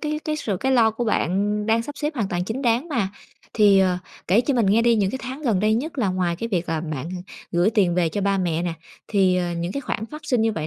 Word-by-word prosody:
cái 300 0 -2
cái 305 0 -1
sự 210 -10 -2
cái 265 +7 0
lo 230 -3 +5
của 230 +2 -3
bạn 205 0 0
đang 225 +1 +2
sắp 290 +4 -8
xếp 300 +1 -2
hoàn 215 -6 -1
toàn 175 0 -2
chính 230 +8 -4
đáng 240 +6 +1
mà. 235 - 0 0.5
Thì, 205 -3 +5
ờ, 185 -2 +2 0.3
kể 205 +6 +5
cho 275 +2 0
mình 235 -4 +2
nghe 215 +4 +4
đi, 235 -1 +4
những 195 -2 +1
cái 265 - -4
tháng 260 +3 -6
gần 225 -9 +1
đây 215 +1 +3
nhất 285 +6 -3
là 210 -6 +2
ngoài 180 -2 0
cái 230 +6 -4
việc 180 -5 -1
là 160 -1 -1
bạn 155 -2 -5 0.4
gửi 175 +5 +3
tiền 190 -6 +2
về 175 -2 +2
cho 205 - -3
ba 200 0 +1
mẹ 170 -2 0
nè, 175 -1 -1 0.4
thì, 190 -3 +3
ờ, 175 -1 -1
những 170 +2 -3
cái 280 - -3
khoản 220 -4 -4
phát 300 +7 -9
sinh 250 -6 +1
như 225 0 +2
vậy 155 -5 -3
210 Hz, 280 wpm, -23 LUFS, 180-240 Hz, 0.5 s, lo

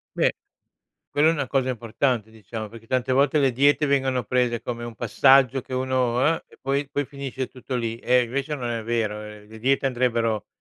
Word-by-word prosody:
Beh, - - +2 0.8
quella 150 +3 +4
è - - +2
una 140 -5 -2
cosa 130 -1 +1
importante, 115 -1 -1
diciamo, 110 0 -7
perché 115 +1 -13
tante 130 +1 0
volte 140 +3 +3
le 135 - +4
diete 145 +4 +3
vengono 135 -2 +1
prese 120 0 0
come 120 -1 -5
un 120 -1 -7
passaggio 130 +3 +4
che 130 - -8
uno, 130 -2 0
uhm, 160 +4 +2
e, - - -20
poi 140 +1 -1
poi 145 0 -1
finisce 135 -2 -5
tutto 130 0 -7
lì. 115 -2 -2
Eh, 125 +1 +3
invece 140 +5 -3
non 125 -4 -4
è 115 -1 -2
vero. 115 -2 -1
Uhm, 105 0 -10
le 110 0 -11
diete 135 +3 +1
andrebbero 115 -4 0
125 Hz, 200 wpm, -24 LUFS, 115-135 Hz, 0.8 s, quella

